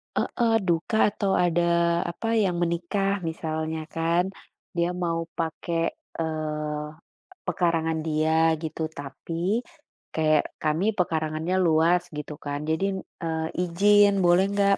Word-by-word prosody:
Heeh, 235 -2 +1
duka 170 +6 +1
atau 200 -2 -1
ada 170 0 +2
apa, 225 +6 -5 0.2
yang 180 -3 +1
menikah 175 +4 0
misalnya 160 0 -3
kan. 165 +2 +2 0.5
Dia 170 0 +1
mau 165 -1 -1
pakai, 165 +1 -1 0.4
eee, 150 -2 -2 0.6
pekarangan 165 -3 +1
dia 160 +1 +3
gitu, 160 0 -5
tapi 165 - -3 0.5
kayak 155 -1 +3 0.2
kami 155 +4 +1
pekarangannya 160 0 0
luas 170 +1 +4 0.2
gitu 150 0 -5
kan, 145 0 -2
jadi, 160 +4 +1 0.4
eee, 160 -1 -1 0.2
ijin 205 +4 +5
boleh 175 +2 +5
nggak 200 -1 +3
165 Hz, 115 wpm, -26 LUFS, 160-180 Hz, 0.6 s, ijin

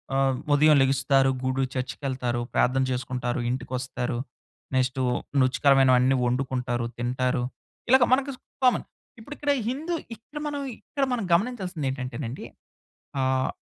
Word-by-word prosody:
ఆహ్, 135 -1 +2 0.2
ఉదయం 150 +1 +6
లెగుస్తారు, 135 0 +3
గుడు 130 +1 0
చర్చుకెళ్తారు, 125 -2 -2
ప్రార్థన 130 +1 +3
చేసుకుంటారు, 125 -1 -2
ఇంటికొస్తారు. 125 -1 -3 0.6
నెక్స్టు 130 0 +1 0.4
రుచికరమైనవన్నీ 130 0 +4
వండుకుంటారు, 125 -1 -1
తింటారు. 125 +1 0 0.5
ఇలాగ 260 -1 +7
మనకిజ్ 270 0 0 0.3
కామన్. 250 - +3 0.3
ఇప్పుడు 255 +7 -9
ఇక్కడ 290 -1 0 0.2
హిందూ 305 +7 -3 0.2
ఇక్కడ 235 +7 -13
మనం 290 -1 -3 0.2
ఇక్కడ 280 -2 -4
మనం 230 -4 -1
గమనించాల్సిందేంటంటేనండి, 145 - -2 0.7
ఆహ్, 130 0 +1
130 Hz, 105 wpm, -26 LUFS, 125-180 Hz, 0.7 s, ఇలాగ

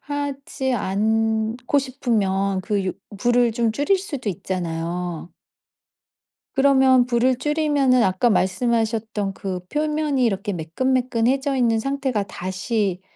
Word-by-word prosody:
하지 280 -2 -3
않고 220 +4 0
싶으면 200 -8 0
그 205 -1 -1
유 185 - -1 0.2
불을 240 +1 +2
좀 230 0 +1
줄일 290 - +2
수도 285 - -5
있잖아요. 175 -1 -4 1.3
그러면 265 -2 +5
불을 250 +1 +2
줄이면은 290 -4 +2
아까 190 +6 +2
말씀하셨던 220 0 0
그 190 -2 -4
표면이 300 -3 0
이렇게 200 -2 0
매끈매끈해져 255 - 0
있는 230 -3 +2
상태가 270 -4 -1
다시 190 +1 -2
235 Hz, 255 characters per minute, -22 LUFS, 195-265 Hz, 1.3 s, 그러면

